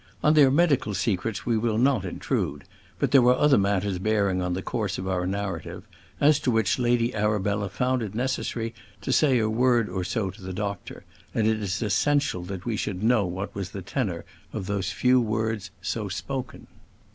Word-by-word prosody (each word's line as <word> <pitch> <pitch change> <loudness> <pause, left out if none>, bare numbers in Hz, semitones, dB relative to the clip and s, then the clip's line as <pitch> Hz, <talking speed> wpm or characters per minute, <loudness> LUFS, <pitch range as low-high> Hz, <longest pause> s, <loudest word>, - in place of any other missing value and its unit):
On 150 - +5
their 145 -3 +6
medical 140 - +2
secrets 95 +2 -1
we 115 -2 +1
will 110 -1 0
not 125 -4 +2
intrude; 75 -4 -2 0.3
but - - 0
there 135 - +7
were 125 +1 +5
other 145 -3 +4
matters 100 -1 0
bearing 100 -2 +1
on 90 0 -1
the 95 - -4
course 105 -6 -2
of 95 - -5
our 90 -1 -1
narrative, 95 -3 -4 0.4
as 150 0 +5
to - - -1
which 110 -3 +2
Lady 120 -1 +2
Arabella 105 -1 0
found 125 +5 0
it 105 -2 -5
necessary 120 -2 -2 0.3
to - - -2
say 135 -1 +4
a 110 -2 +1
word 120 0 +2
or 90 0 -3
so 95 +1 -2
to 100 +2 -16
the 95 0 -6
doctor; 100 -1 -5 0.3
and 110 - +2
it 110 -1 +1
is 100 +2 -2
essential 115 0 +1
that 95 -1 -6
we 115 - -1
should 100 -2 -3
know 110 -4 +3
what 95 +3 -5
was 95 -2 -4
the - - -7
tenor - - -3 0.3
of - - -4
those 100 0 -2
few 125 +5 +3
words 110 -2 -2
so 105 +1 -2
spoken. 130 +7 -5
110 Hz, 195 wpm, -26 LUFS, 95-120 Hz, 0.4 s, there